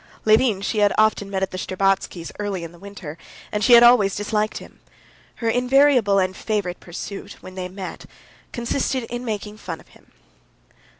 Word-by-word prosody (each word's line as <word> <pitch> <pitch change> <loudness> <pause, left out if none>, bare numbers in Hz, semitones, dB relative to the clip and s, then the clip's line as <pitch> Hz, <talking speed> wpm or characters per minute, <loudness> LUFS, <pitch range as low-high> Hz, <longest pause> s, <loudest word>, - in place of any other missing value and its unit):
Levin 215 -2 +4
she 210 +2 -1
had 205 -1 +4
often 215 -2 +2
met 190 -1 -1
at 190 - -2
the 185 - -5
Shtcherbatskys' 190 -3 -1
early 200 -4 -3
in 165 - -7
the 175 - -17
winter, 185 -5 -9 0.3
and 210 0 -1
she 250 - +6
had 235 0 +9
always 230 -5 +6
disliked 210 +1 -1
him. - - -12 0.6
Her 230 - -4
invariable 250 -3 +4
and 185 -1 +1
favorite 200 -5 -2
pursuit, 195 +3 -7
when 185 - -10
they 185 -1 -5
met, 190 0 -8 0.4
consisted 255 +1 -1
in 240 +1 -4
making 210 -2 -4
fun - - -6
of - - -19
him. - - -22
205 Hz, 175 wpm, -22 LUFS, 190-230 Hz, 0.6 s, had